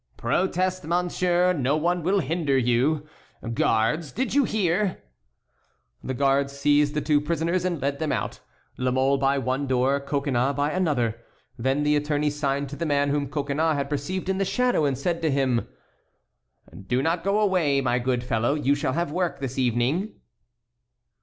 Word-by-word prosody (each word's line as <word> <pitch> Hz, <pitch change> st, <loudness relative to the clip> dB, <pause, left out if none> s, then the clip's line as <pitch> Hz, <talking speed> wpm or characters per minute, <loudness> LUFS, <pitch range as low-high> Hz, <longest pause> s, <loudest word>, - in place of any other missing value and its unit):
"Protest, 185 Hz, 0 st, 0 dB
monsieur, 180 Hz, +1 st, +1 dB
no 140 Hz, -2 st, +1 dB
one 175 Hz, +3 st, 0 dB
will 190 Hz, +4 st, +1 dB
hinder 155 Hz, -2 st, 0 dB
you. 130 Hz, +5 st, +1 dB, 0.5 s
Guards, 115 Hz, +8 st, +1 dB
did 260 Hz, -, -2 dB
you 280 Hz, -1 st, +4 dB
hear?" 195 Hz, -2 st, 0 dB, 1.0 s
The 130 Hz, -, -3 dB
guards 140 Hz, +1 st, +1 dB
seized 145 Hz, +1 st, +2 dB
the 150 Hz, -, 0 dB
two 145 Hz, 0 st, +2 dB
prisoners 170 Hz, +3 st, -1 dB
and 175 Hz, -4 st, -1 dB
led 140 Hz, +1 st, -2 dB
them 155 Hz, -2 st, -1 dB
out, -, -, -3 dB, 0.4 s
La 125 Hz, 0 st, +1 dB
Mole 135 Hz, +2 st, +2 dB
by 135 Hz, +1 st, +2 dB
one 130 Hz, +2 st, -1 dB
door, 130 Hz, +2 st, +2 dB
Coconnas 140 Hz, -2 st, -1 dB
by 145 Hz, +2 st, 0 dB
another. 125 Hz, -11 st, 0 dB, 0.3 s
Then 135 Hz, +5 st, 0 dB
the 150 Hz, 0 st, +3 dB
attorney 150 Hz, 0 st, 0 dB
signed 140 Hz, -1 st, -1 dB
to 145 Hz, -, -7 dB
the 170 Hz, -, -4 dB
man 145 Hz, -1 st, +2 dB
whom 140 Hz, -1 st, -1 dB
Coconnas 150 Hz, +2 st, 0 dB
had 140 Hz, 0 st, -3 dB
perceived 175 Hz, +7 st, -3 dB
in 190 Hz, 0 st, 0 dB
the -, -, +2 dB
shadow, 245 Hz, -, +1 dB
and 135 Hz, -2 st, 0 dB
said 170 Hz, +5 st, -2 dB
to 160 Hz, -, +1 dB
him: 135 Hz, -4 st, +1 dB, 1.2 s
"Do 125 Hz, +4 st, +1 dB
not 165 Hz, +2 st, 0 dB
go 200 Hz, +2 st, +1 dB
away, 180 Hz, -9 st, +2 dB
my 125 Hz, -2 st, +1 dB
good 125 Hz, 0 st, -1 dB
fellow, 120 Hz, +3 st, 0 dB
you 140 Hz, -2 st, +2 dB
shall 145 Hz, -2 st, -1 dB
have 170 Hz, 0 st, -1 dB
work 175 Hz, +1 st, -1 dB
this 135 Hz, -1 st, -4 dB
evening." 130 Hz, -, 0 dB
145 Hz, 170 wpm, -25 LUFS, 135-170 Hz, 1.2 s, you